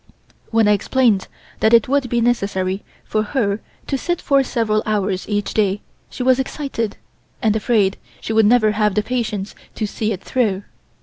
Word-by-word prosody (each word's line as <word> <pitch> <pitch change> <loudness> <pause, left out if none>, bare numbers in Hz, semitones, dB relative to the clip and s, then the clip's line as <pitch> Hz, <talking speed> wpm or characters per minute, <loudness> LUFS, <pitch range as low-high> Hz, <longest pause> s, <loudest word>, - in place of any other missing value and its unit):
When 225 -2 +3
I - - +5
explained 210 -1 +2 0.3
that 220 +2 +5
it 230 - +4
would 275 -1 +1
be 235 0 +1
necessary 200 -5 0 0.2
for 215 - -1
her 215 -3 0 0.3
to 275 - -1
sit 350 +4 -1
for 275 -1 +3
several 215 -4 0
hours 200 -3 -1
each 205 -1 -1
day 205 -2 +1 0.3
she 250 - -5
was 255 0 +4
excited, 265 -5 -3 0.4
and 220 -3 +2
afraid 210 -3 +2 0.2
she 220 - -4
would 220 -1 +5
never 220 -2 +4
have 210 -1 +1
the 210 - +2
patience 220 -5 -2 0.2
to 220 - -1
see 215 +1 -2
it 190 -3 -4
through. 205 -6 0
215 Hz, 175 wpm, -20 LUFS, 205-245 Hz, 0.4 s, I